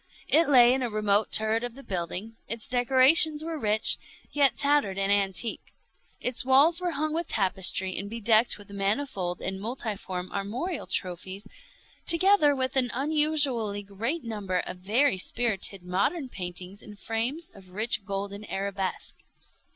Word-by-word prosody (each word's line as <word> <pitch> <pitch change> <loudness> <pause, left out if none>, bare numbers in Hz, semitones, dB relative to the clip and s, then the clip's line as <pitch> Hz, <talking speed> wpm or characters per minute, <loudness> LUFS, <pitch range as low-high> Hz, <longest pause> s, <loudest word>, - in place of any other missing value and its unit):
It 320 0 +4
lay 245 -3 +6
in 265 - -1
a 245 - -1
remote 210 -1 +1
turret 220 +1 +1
of 245 -1 -6
the 275 - -11
building. 185 +3 -5
Its 230 -1 -2
decorations 270 +5 +5
were 325 -1 -5
rich, 215 -2 +3 0.3
yet 275 -5 +2
tattered 280 -9 +1
and 195 0 0
antique. 200 +2 -1 0.4
Its 250 -1 0
walls 285 +7 +4
were 360 - -1
hung 310 +1 -1
with 335 +2 -2
tapestry 190 -1 +2
and 200 +1 -5
bedecked 225 +1 +3
with 205 -1 -14
manifold 200 -3 -2
and 190 +1 -4
multiform 205 -6 -5
armorial 240 - -4
trophies, 185 +3 -4 0.6
together 335 -4 +5
with 260 0 -2
an 255 -2 +2
unusually 280 -7 0
great 225 - -3
number 205 -5 -3
of 180 - -7
very 215 +4 +1
spirited 195 -3 -1
modern 255 - -1
paintings 180 0 -7
in 210 - -12
frames 245 - -3
of 185 - -16
rich 215 +3 0
golden 200 +1 -5
arabesque. 195 -1 -4
220 Hz, 145 wpm, -27 LUFS, 195-270 Hz, 0.6 s, lay